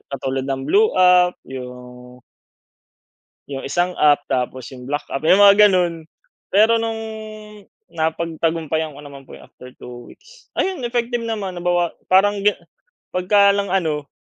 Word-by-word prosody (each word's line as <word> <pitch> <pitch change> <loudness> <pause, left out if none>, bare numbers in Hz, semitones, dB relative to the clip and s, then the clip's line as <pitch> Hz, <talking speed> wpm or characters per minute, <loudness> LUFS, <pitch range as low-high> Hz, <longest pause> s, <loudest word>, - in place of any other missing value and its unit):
katulad 135 0 -3
ng 135 -1 -3
blue 435 - +2
app 180 -1 +4
yung 125 -1 -11 1.3
yung 135 -1 -6
isang 175 +4 -1
app 145 -1 +3
tapos 130 -1 -3
yung 125 -1 -11
black 145 +1 -3
app 135 - -5
yung 185 +5 +4
mga 205 +1 +7
ganon, 175 -3 0 0.5
pero 215 +4 +4
nung 225 -1 -3 0.9
napagtagumpayan 160 -1 -2
ko - - -11
naman 140 -2 -12
po - - -13
yung - - -16
after 125 0 -14
two 120 -1 -11
weeks, - - -20
ayun 370 -9 -2
effective 240 0 -2
naman 210 -5 -4
nabawa 175 -1 0 0.2
parang 200 +2 +3 0.7
pagka 200 +2 +3
lang 200 0 -1
ano, 155 -6 -1
170 Hz, 140 wpm, -20 LUFS, 135-200 Hz, 1.3 s, mga